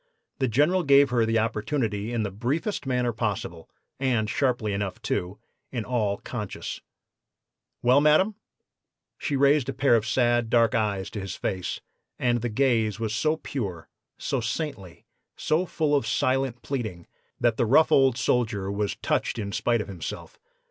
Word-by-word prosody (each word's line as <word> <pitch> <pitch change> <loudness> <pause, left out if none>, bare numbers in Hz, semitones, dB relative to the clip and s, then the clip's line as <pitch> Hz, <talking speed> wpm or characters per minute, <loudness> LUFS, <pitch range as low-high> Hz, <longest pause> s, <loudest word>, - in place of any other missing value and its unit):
The 130 - +2
General 150 - +3
gave 140 -3 +5
her 115 -2 +2
the 115 0 +2
opportunity 110 -1 -1
in 115 -2 0
the 100 - -3
briefest 135 - -2
manner 125 -2 0
possible, 100 -7 -3 0.3
and 125 -5 +1
sharply 120 -2 0
enough, 100 -1 -3
too, 90 +3 -2 0.3
in 120 -4 -3
all 110 -5 0
conscience. 105 -3 -6 1.0
"'Well, 125 +4 +5
madam?' 155 +8 +4 0.9
"She 145 - -1
raised 140 -1 +3
a - - -2
pair 135 -3 +3
of 110 -1 0
sad, 120 0 +2
dark 115 0 +3
eyes 105 -4 -1
to 105 - -5
his 95 -1 -5
face, 95 -3 -3 0.4
and 120 -2 +1
the 120 - -1
gaze 115 -3 +1
was 110 -2 -2
so 155 +6 +1
pure, 100 - -5 0.3
so 135 - -2
saintly, 115 - -5 0.3
so 165 +4 +1
full 150 -3 +1
of 140 -6 0
silent 130 0 0
pleading, 110 -11 -4 0.3
that 120 -2 +2
the 120 - +1
rough 155 +7 +5
old 135 -3 +4
soldier 110 -7 0
was 100 0 -1
touched - - 0
in 100 -3 -3
spite 110 +2 +1
of - - -6
himself. 90 -5 -7
120 Hz, 160 wpm, -26 LUFS, 105-135 Hz, 1.0 s, gave